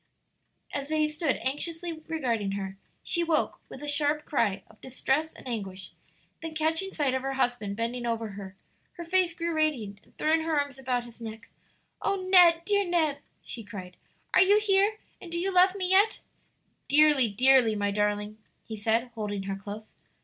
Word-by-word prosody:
As 280 Hz, 0 st, -3 dB
they 310 Hz, -1 st, +2 dB
stood 305 Hz, -2 st, -1 dB
anxiously 330 Hz, +5 st, -3 dB
regarding 235 Hz, -11 st, -1 dB
her, 195 Hz, -1 st, -4 dB, 0.3 s
she 345 Hz, -, +1 dB
woke 325 Hz, -2 st, 0 dB
with -, -, -10 dB
a -, -, -5 dB
sharp 295 Hz, +1 st, +1 dB
cry 200 Hz, -9 st, 0 dB
of 220 Hz, -, -21 dB
distress 265 Hz, +4 st, -1 dB
and -, -, -13 dB
anguish, 195 Hz, -5 st, -5 dB, 0.5 s
then 325 Hz, -1 st, -6 dB
catching 320 Hz, +5 st, 0 dB
sight 285 Hz, -7 st, 0 dB
of 260 Hz, -, 0 dB
her 270 Hz, +1 st, -3 dB
husband 245 Hz, -6 st, 0 dB
bending 235 Hz, +2 st, -3 dB
over 230 Hz, -1 st, -2 dB
her, 195 Hz, -1 st, -9 dB, 0.4 s
her 345 Hz, -, -8 dB
face 360 Hz, -1 st, +2 dB
grew 340 Hz, -1 st, -2 dB
radiant, 250 Hz, -11 st, -1 dB
and -, -, -27 dB
throwing 320 Hz, +1 st, +2 dB
her 320 Hz, -2 st, +1 dB
arms 285 Hz, -2 st, -3 dB
about 250 Hz, -2 st, -1 dB
his 235 Hz, 0 st, -14 dB
neck, 225 Hz, 0 st, -8 dB, 0.5 s
"O 395 Hz, -, +1 dB
Ned, 360 Hz, -3 st, +5 dB
dear 405 Hz, -1 st, +2 dB
Ned!" 325 Hz, -6 st, +1 dB, 0.2 s
she 230 Hz, -, -7 dB
cried, 190 Hz, -3 st, -9 dB, 0.4 s
"are -, -, +6 dB
you 400 Hz, +3 st, +5 dB
here? 410 Hz, 0 st, +2 dB, 0.2 s
and 345 Hz, -, -10 dB
do 340 Hz, -, -3 dB
you 380 Hz, +3 st, -1 dB
love 370 Hz, +1 st, +5 dB
me 370 Hz, -2 st, -2 dB
yet?" 405 Hz, +3 st, +4 dB, 0.7 s
"Dearly, 290 Hz, -4 st, +5 dB
dearly, 250 Hz, +1 st, +4 dB
my 205 Hz, -1 st, 0 dB
darling," 210 Hz, +1 st, -1 dB, 0.2 s
he 220 Hz, -1 st, -7 dB
said, 225 Hz, +3 st, 0 dB
holding 205 Hz, -3 st, -4 dB
her 195 Hz, 0 st, -3 dB
close. 205 Hz, +2 st, -9 dB
270 Hz, 180 wpm, -28 LUFS, 220-330 Hz, 0.7 s, are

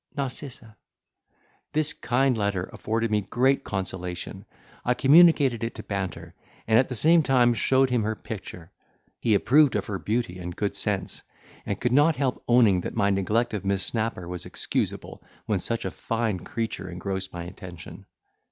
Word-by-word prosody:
"N—." 135 Hz, -2 st, -1 dB, 1.4 s
This 155 Hz, 0 st, +1 dB
kind 125 Hz, +1 st, +1 dB
letter 100 Hz, -4 st, -1 dB
afforded 115 Hz, +1 st, -2 dB
me 105 Hz, -1 st, +2 dB
great 130 Hz, +7 st, +1 dB
consolation: 90 Hz, -2 st, -5 dB, 0.4 s
I 125 Hz, -, +1 dB
communicated 140 Hz, -4 st, +5 dB
it 115 Hz, -, -3 dB
to 110 Hz, -, -8 dB
Banter, 100 Hz, -3 st, -5 dB, 0.3 s
and, 110 Hz, 0 st, +5 dB
at 130 Hz, -, +2 dB
the 125 Hz, -, -5 dB
same 165 Hz, +7 st, +5 dB
time, 125 Hz, -4 st, +3 dB
showed 130 Hz, +3 st, +2 dB
him 125 Hz, -2 st, +2 dB
her 110 Hz, +1 st, -1 dB
picture: 95 Hz, -6 st, -8 dB, 0.5 s
he 110 Hz, -3 st, +2 dB
approved 140 Hz, +6 st, +4 dB
of 105 Hz, -2 st, -1 dB
her 95 Hz, -2 st, -4 dB
beauty 105 Hz, -2 st, -2 dB
and 90 Hz, -1 st, -6 dB
good 105 Hz, -, -2 dB
sense, -, -, -2 dB, 0.5 s
and 100 Hz, -, -2 dB
could 120 Hz, 0 st, 0 dB
not 145 Hz, +4 st, +5 dB
help 130 Hz, -2 st, -1 dB
owning 115 Hz, -7 st, +5 dB
that -, -, -6 dB
my 100 Hz, -2 st, +2 dB
neglect 105 Hz, +5 st, 0 dB
of 105 Hz, -3 st, -3 dB
Miss 95 Hz, -1 st, 0 dB
Snapper 110 Hz, -6 st, -2 dB
was 90 Hz, -1 st, -5 dB
excusable, -, -, -3 dB, 0.2 s
when 105 Hz, -3 st, 0 dB
such 115 Hz, +5 st, -3 dB
a -, -, -2 dB
fine 115 Hz, -4 st, -2 dB
creature 115 Hz, -6 st, -4 dB
engrossed 95 Hz, +1 st, -4 dB
my 85 Hz, -1 st, -6 dB
attention. 90 Hz, -1 st, -10 dB
110 Hz, 165 wpm, -26 LUFS, 95-125 Hz, 1.4 s, communicated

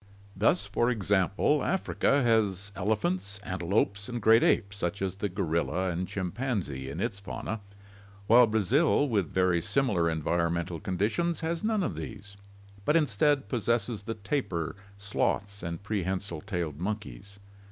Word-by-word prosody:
Thus, 110 Hz, -, +2 dB
for 120 Hz, -, +1 dB
example, 105 Hz, +5 st, +2 dB
Africa 145 Hz, -6 st, +1 dB
has 105 Hz, -4 st, +1 dB
elephants, 100 Hz, 0 st, -1 dB
antelopes, 100 Hz, +3 st, -1 dB
and 120 Hz, -1 st, -3 dB
great 115 Hz, +2 st, +6 dB
apes 100 Hz, -1 st, +2 dB
such 100 Hz, +2 st, -2 dB
as 95 Hz, -1 st, -2 dB
the 100 Hz, 0 st, -2 dB
gorilla 90 Hz, 0 st, 0 dB
and 90 Hz, +2 st, -2 dB
chimpanzee 95 Hz, -, -3 dB
in 75 Hz, +5 st, -6 dB
its 100 Hz, -1 st, -2 dB
fauna, 110 Hz, +2 st, -5 dB, 0.7 s
while 120 Hz, +3 st, +7 dB
Brazil, 130 Hz, -, +3 dB
with 100 Hz, -, 0 dB
very 90 Hz, -2 st, +2 dB
similar 100 Hz, -9 st, +1 dB
environmental 85 Hz, +2 st, -1 dB
conditions, 110 Hz, -, -1 dB
has 165 Hz, +2 st, -2 dB
none 215 Hz, -2 st, +1 dB
of 105 Hz, -, -1 dB
these, 100 Hz, +7 st, -8 dB, 0.5 s
but 150 Hz, -, +2 dB
instead 145 Hz, -1 st, +2 dB
possesses 115 Hz, -2 st, 0 dB
the 115 Hz, +2 st, -4 dB
tapir, 100 Hz, -, -2 dB, 0.2 s
sloths, 100 Hz, 0 st, -1 dB
and 85 Hz, +2 st, -5 dB
pre 105 Hz, -1 st, -1 dB
hensile 95 Hz, -3 st, -3 dB
tailed 85 Hz, -7 st, -3 dB
monkeys. 100 Hz, 0 st, -5 dB
100 Hz, 140 wpm, -29 LUFS, 90-115 Hz, 0.7 s, while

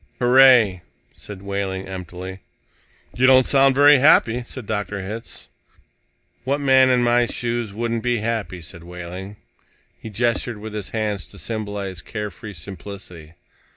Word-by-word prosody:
"Hooray," 125 Hz, -7 st, +5 dB, 0.3 s
said 100 Hz, -2 st, -10 dB
Wehling 100 Hz, -1 st, -3 dB
emptily. 95 Hz, 0 st, -7 dB, 0.8 s
"You 130 Hz, +1 st, +3 dB
don't 130 Hz, -1 st, +6 dB
sound 135 Hz, -1 st, +4 dB
very 145 Hz, 0 st, +7 dB
happy," 125 Hz, -4 st, +4 dB
said 130 Hz, -4 st, -8 dB
Dr. 105 Hz, -2 st, -3 dB
Hitz. 110 Hz, +4 st, -8 dB, 1.0 s
"What 140 Hz, +3 st, -1 dB
man 130 Hz, -2 st, +5 dB
in 125 Hz, -1 st, +3 dB
my 120 Hz, 0 st, +3 dB
shoes 120 Hz, -3 st, -3 dB
wouldn't 115 Hz, +2 st, -2 dB
be 120 Hz, 0 st, 0 dB
happy?" 105 Hz, -5 st, -3 dB
said 85 Hz, +2 st, -8 dB
Wehling. 90 Hz, +3 st, -8 dB, 0.7 s
He 110 Hz, -, -7 dB
gestured 115 Hz, +1 st, -1 dB
with 105 Hz, +1 st, -8 dB
his 105 Hz, -2 st, -5 dB
hands 105 Hz, -4 st, -3 dB
to 100 Hz, -, -14 dB
symbolize 100 Hz, -4 st, -5 dB
care 105 Hz, -1 st, -5 dB
free 105 Hz, +3 st, -10 dB
simplicity. 85 Hz, -2 st, -10 dB
105 Hz, 140 wpm, -21 LUFS, 95-120 Hz, 1.0 s, very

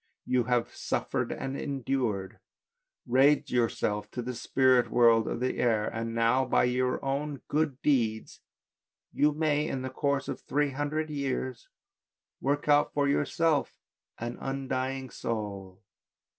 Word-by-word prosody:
You 125 Hz, -2 st, +1 dB
have 120 Hz, -1 st, 0 dB
suffered -, -, -2 dB
and 135 Hz, 0 st, -4 dB
endured, 130 Hz, -9 st, -2 dB, 0.7 s
raised 135 Hz, +4 st, +3 dB
yourself 110 Hz, -3 st, 0 dB
to 125 Hz, -, -5 dB
the 125 Hz, +1 st, -4 dB
spirit 125 Hz, -1 st, +3 dB
world 115 Hz, -2 st, +5 dB
of -, -, -2 dB
the 130 Hz, -, -1 dB
air; 110 Hz, -3 st, +2 dB
and 115 Hz, 0 st, -4 dB
now, 115 Hz, +3 st, +3 dB
by 130 Hz, -, +2 dB
your 125 Hz, +2 st, 0 dB
own 140 Hz, 0 st, -2 dB
good 150 Hz, -3 st, 0 dB
deeds 115 Hz, -7 st, 0 dB, 0.7 s
you 150 Hz, +1 st, +3 dB
may, 150 Hz, 0 st, +1 dB
in 130 Hz, -4 st, -3 dB
the 130 Hz, -, -4 dB
course 140 Hz, 0 st, -1 dB
of -, -, -5 dB
three 145 Hz, 0 st, 0 dB
hundred 150 Hz, +3 st, -2 dB
years, 130 Hz, -4 st, -3 dB, 0.7 s
work 145 Hz, +3 st, -1 dB
out 145 Hz, 0 st, +4 dB
for 145 Hz, -1 st, +2 dB
yourself 145 Hz, +2 st, +1 dB, 0.4 s
an 120 Hz, +1 st, -5 dB
undying 135 Hz, -1 st, -3 dB
soul." 100 Hz, -4 st, -5 dB
130 Hz, 135 wpm, -29 LUFS, 120-140 Hz, 0.7 s, world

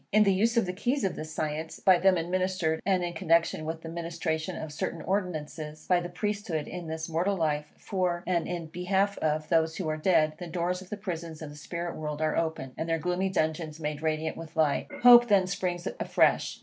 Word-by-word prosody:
In 215 Hz, +1 st, +6 dB
the 200 Hz, -2 st, +4 dB
use 230 Hz, +5 st, +2 dB
of 230 Hz, -, +4 dB
the 180 Hz, -, -3 dB
keys 250 Hz, +9 st, -1 dB
of 190 Hz, -, 0 dB
this 155 Hz, 0 st, -6 dB
science, 155 Hz, +1 st, -3 dB
by 185 Hz, -2 st, +5 dB
them 190 Hz, 0 st, +4 dB
administered, 175 Hz, -1 st, 0 dB
and 185 Hz, -2 st, +3 dB
in 175 Hz, 0 st, -2 dB
connexion 165 Hz, -2 st, +2 dB
with 160 Hz, +1 st, -4 dB
the -, -, -6 dB
ministration 165 Hz, -1 st, -3 dB
of 155 Hz, -2 st, -6 dB
certain 165 Hz, +2 st, -3 dB
ordinances, 155 Hz, -5 st, -3 dB
by 180 Hz, -1 st, +4 dB
the 175 Hz, 0 st, -5 dB
Priesthood 200 Hz, -4 st, -2 dB
in 175 Hz, -1 st, -6 dB
this 160 Hz, 0 st, -4 dB
mortal 175 Hz, +4 st, 0 dB
life, 150 Hz, -3 st, -1 dB
for, 180 Hz, -3 st, -1 dB
and 175 Hz, -2 st, 0 dB
in 175 Hz, -2 st, -3 dB
behalf 190 Hz, +4 st, 0 dB
of, 155 Hz, 0 st, -1 dB
those 160 Hz, -1 st, +2 dB
who 185 Hz, -, -3 dB
are 155 Hz, -, -1 dB
dead, 155 Hz, -2 st, +3 dB
the 175 Hz, -, -6 dB
doors 175 Hz, +2 st, -1 dB
of 185 Hz, -, -12 dB
the 210 Hz, -, -4 dB
prisons 170 Hz, -5 st, -5 dB
of 150 Hz, -, -7 dB
the -, -, -11 dB
spirit 170 Hz, +3 st, -5 dB
world 150 Hz, -1 st, -4 dB
are 155 Hz, -1 st, +1 dB
opened, 160 Hz, -6 st, -2 dB
and 165 Hz, -, -2 dB
their 165 Hz, -, +2 dB
gloomy 180 Hz, +3 st, 0 dB
dungeons 155 Hz, -2 st, -1 dB
made 150 Hz, -1 st, -3 dB
radiant 160 Hz, 0 st, -1 dB
with 165 Hz, -1 st, -9 dB
light. 155 Hz, -3 st, +2 dB, 0.2 s
Hope 240 Hz, -1 st, +9 dB
then 200 Hz, -4 st, +4 dB
springs 180 Hz, -1 st, -2 dB
afresh. -, -, +2 dB
170 Hz, 215 wpm, -28 LUFS, 155-185 Hz, 0.2 s, Hope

